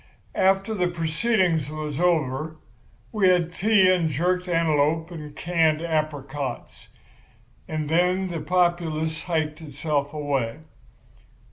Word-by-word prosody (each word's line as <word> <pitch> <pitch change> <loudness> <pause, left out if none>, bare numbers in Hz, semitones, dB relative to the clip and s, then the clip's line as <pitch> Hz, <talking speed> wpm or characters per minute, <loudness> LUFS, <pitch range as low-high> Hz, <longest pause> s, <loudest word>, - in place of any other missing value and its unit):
"After 195 +3 +2
the 180 -4 +1
proceedings 170 - 0
was 150 -1 -5
over 160 -3 0 0.5
we 210 -4 +2
had 175 -2 +2
tea 205 0 +4
and 175 -3 +2
jerked 180 +5 0
antelope 160 0 +1
and 150 -3 -8
canned 165 -3 +2
apricots, 145 -5 -3 0.8
and 155 -1 -3
then 180 +4 +2
the 170 -2 -3
populace 160 -2 0
hiked 155 -2 -1
itself 145 -1 -2
away. 140 -5 -2
160 Hz, 110 wpm, -24 LUFS, 150-180 Hz, 0.8 s, tea